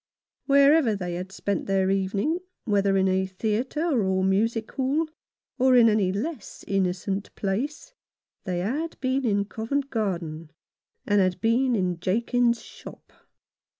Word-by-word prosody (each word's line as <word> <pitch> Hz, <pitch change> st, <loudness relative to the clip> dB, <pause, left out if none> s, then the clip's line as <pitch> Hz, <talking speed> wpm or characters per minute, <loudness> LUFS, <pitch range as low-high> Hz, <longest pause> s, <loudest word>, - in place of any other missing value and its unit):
Wherever 280 Hz, -3 st, +5 dB
they 180 Hz, -3 st, -4 dB
had 180 Hz, +2 st, -5 dB
spent 200 Hz, 0 st, -3 dB
their 195 Hz, -1 st, +2 dB
evening, 200 Hz, -, 0 dB, 0.3 s
whether 200 Hz, -3 st, +2 dB
in 190 Hz, 0 st, +3 dB
a 190 Hz, 0 st, +1 dB
theatre 235 Hz, -, -1 dB
or 190 Hz, 0 st, +1 dB
music 220 Hz, +4 st, 0 dB
hall, 280 Hz, +4 st, 0 dB, 0.5 s
or 260 Hz, 0 st, +5 dB
any 215 Hz, -5 st, +4 dB
less 230 Hz, -, -5 dB
innocent 195 Hz, +1 st, -1 dB
place, 270 Hz, -, -3 dB, 0.5 s
they 180 Hz, -2 st, -2 dB
had 295 Hz, -, -3 dB
been 265 Hz, +1 st, 0 dB
in 200 Hz, -2 st, +1 dB
Covent 270 Hz, +7 st, -3 dB
Garden, 170 Hz, -8 st, -3 dB, 0.6 s
and 205 Hz, -1 st, +3 dB
had 185 Hz, -1 st, 0 dB
been 240 Hz, +4 st, +2 dB
in 180 Hz, -4 st, -1 dB
Jakins's 235 Hz, +5 st, +1 dB
shop. -, -, -13 dB
210 Hz, 130 wpm, -25 LUFS, 190-255 Hz, 0.6 s, Wherever